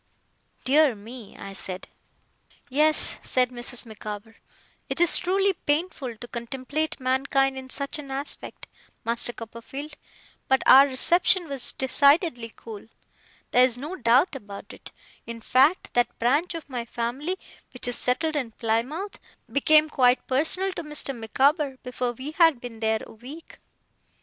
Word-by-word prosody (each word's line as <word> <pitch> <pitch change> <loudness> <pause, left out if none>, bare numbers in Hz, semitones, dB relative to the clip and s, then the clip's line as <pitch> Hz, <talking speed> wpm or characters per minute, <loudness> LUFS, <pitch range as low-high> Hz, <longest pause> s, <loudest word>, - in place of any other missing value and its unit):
'Dear 285 -1 +4
me!' 225 +1 -12
I 195 - -9
said. 185 -1 -3 0.8
'Yes,' 305 +3 +3
said 250 -1 +1
Mrs. 245 0 -1
Micawber. 215 0 -9 0.5
'It - - -3
is 345 0 +5
truly 390 +2 +1
painful 290 -7 -3
to 240 - -10
contemplate 265 +7 -4
mankind 270 +1 +1
in 260 0 -8
such 280 +4 -2
an 280 -2 -9
aspect, 275 +2 -4 0.4
Master 235 +1 +1
Copperfield, 240 +6 -9 0.5
but 265 0 +2
our 275 +2 +8
reception 345 +6 +3
was, 275 -4 -3
decidedly, 280 - +2
cool. 220 -2 -11 0.6
There 250 - +5
is 250 -2 +2
no 300 +8 -6
doubt 255 +4 +3
about 205 -6 -10
it. - - -13 0.4
In 230 0 -7
fact, 270 +9 +2
that 240 0 0
branch 290 +9 +1
of 330 - -7
my 250 -4 -4
family 245 +10 -4 0.3
which 250 - -6
is 245 - -2
settled 310 +7 -1
in 250 -6 -3
Plymouth 250 - -3 0.3
became 305 +2 +4
quite 255 -4 +2
personal 325 +8 +3
to 340 - -6
Mr. 300 -3 0
Micawber, 270 +5 +1
before 250 -1 -3
we 260 +5 -6
had 325 -5 +4
been 235 -2 -9
there 220 0 0
a - - -14
week. 265 +9 -11
260 Hz, 145 wpm, -25 LUFS, 235-300 Hz, 0.8 s, our